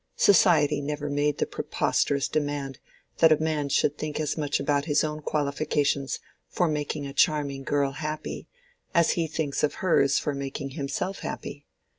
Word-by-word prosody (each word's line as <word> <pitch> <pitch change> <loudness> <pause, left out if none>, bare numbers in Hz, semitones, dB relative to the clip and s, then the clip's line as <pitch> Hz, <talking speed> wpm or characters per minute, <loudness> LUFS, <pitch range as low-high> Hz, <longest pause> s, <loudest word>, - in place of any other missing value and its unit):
Society 150 -6 +5
never 145 0 -3
made 145 0 +1
the - - +1
preposterous 140 -1 0
demand 145 -3 -2 0.4
that 160 -1 +6
a 155 - +6
man 155 -2 -1
should 145 +1 +1
think 155 -1 -3
as 155 -2 -1
much 145 -3 -1
about 145 -1 0
his 150 -2 +2
own 155 0 -3
qualifications 145 -2 0 0.3
for 175 - 0
making 150 -1 -2
a 140 - -6
charming 145 -1 +1
girl 140 0 +1
happy 155 +2 -5 0.5
as 170 -1 +4
he 165 -2 0
thinks 155 -3 -2
of 150 - +1
hers 140 -7 +3
for 150 - -1
making 140 0 -5
himself 165 +7 -3
happy. - - -6
145 Hz, 160 wpm, -26 LUFS, 140-155 Hz, 0.5 s, that